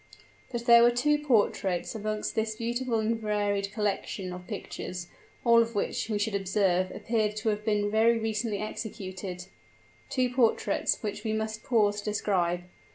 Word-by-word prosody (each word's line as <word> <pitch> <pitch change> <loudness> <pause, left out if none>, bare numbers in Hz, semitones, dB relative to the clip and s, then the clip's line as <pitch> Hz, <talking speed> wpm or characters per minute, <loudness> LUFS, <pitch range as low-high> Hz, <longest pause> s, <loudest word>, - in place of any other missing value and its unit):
But 240 -1 -4
there 235 -1 +8
were 240 - +7
two 295 +5 +2
portraits 205 -9 +1
amongst 215 -1 -3
this 220 0 -1
beautiful 235 +1 -1
and 225 +1 0
varied 205 -2 0
collection 200 -3 -2
of 180 0 -9
pictures, 180 0 -5 0.4
all 235 -1 +7
of 230 -1 -2
which, 205 - -1
we 215 - 0
should 210 +1 -1
observe, 190 -2 +1
appeared 215 -2 -1
to 215 +1 -1
have 210 0 -1
been 205 -1 +1
very 225 +2 +4
recently 220 -1 -1
executed 190 -3 -5 0.6
two 255 -2 +1
portraits 240 -2 +1
which 210 -1 -4
we 220 -2 -1
must 220 0 -2
pause 210 -4 +2
to 205 - -8
describe. 180 -4 0
215 Hz, 160 wpm, -28 LUFS, 200-230 Hz, 0.6 s, there